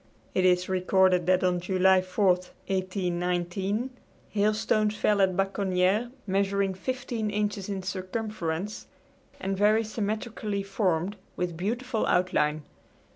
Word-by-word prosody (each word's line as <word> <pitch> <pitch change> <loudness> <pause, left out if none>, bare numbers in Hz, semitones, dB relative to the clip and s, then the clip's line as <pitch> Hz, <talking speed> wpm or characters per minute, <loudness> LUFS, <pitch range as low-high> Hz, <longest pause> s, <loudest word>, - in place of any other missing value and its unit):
It 185 - +2
is 180 0 +3
recorded 185 -1 +3
that 185 0 +3
on 180 -1 +2
July 185 +1 +4
4, 185 +3 -1
1819, 185 +3 -1 0.4
hailstones 215 0 +1
fell 210 -1 +2
at 185 -2 +2
Baconniere 195 +2 +1 0.2
measuring 195 0 +1
fifteen 240 +1 -3
inches 205 -1 -2
in 195 -2 -3
circumference, 185 -1 -4 0.5
and 195 +1 -2
very 210 +3 +4
symmetrically 215 -1 -3
formed, 195 -1 0 0.2
with 175 -2 -2
beautiful 230 +6 -1
outline. 155 -4 +1
195 Hz, 110 wpm, -27 LUFS, 180-210 Hz, 0.5 s, July